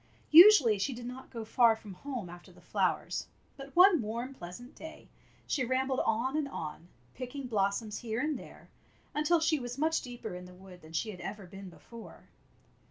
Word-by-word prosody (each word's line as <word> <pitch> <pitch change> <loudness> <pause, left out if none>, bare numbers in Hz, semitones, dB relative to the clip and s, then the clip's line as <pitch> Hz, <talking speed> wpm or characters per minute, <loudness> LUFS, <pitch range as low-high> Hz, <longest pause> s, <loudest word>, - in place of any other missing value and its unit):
Usually 310 - +9
she 245 +6 -1
did 240 0 -8
not 250 +2 -8
go 230 -3 -7
far 230 0 +4
from 210 -3 -11
home 250 -1 -6
after 175 0 -12
the - - -18
flowers, - - -1 0.3
but 275 -1 -11
one 360 -4 +7
warm, 235 +5 -4
pleasant 240 +3 -10
day 320 0 -11 0.4
she 270 - -1
rambled 260 +1 0
on 235 +5 0
and 305 -2 0
on, 165 - -7 0.3
picking 255 +2 -6
blossoms 210 -1 -1
here 225 -1 -3
and 300 +3 0
there, - - -12 0.4
until 305 +3 +2
she 320 -1 +2
was 245 0 -6
much 320 +2 +1
deeper 240 -5 -7
in 180 0 -8
the 180 0 -13
wood 185 -1 -14
than 155 +1 -14
she 215 +7 -1
had 180 -3 -10
ever 200 0 -6
been 195 +1 -10
before. 180 +8 -13
240 Hz, 185 wpm, -31 LUFS, 200-275 Hz, 0.4 s, Usually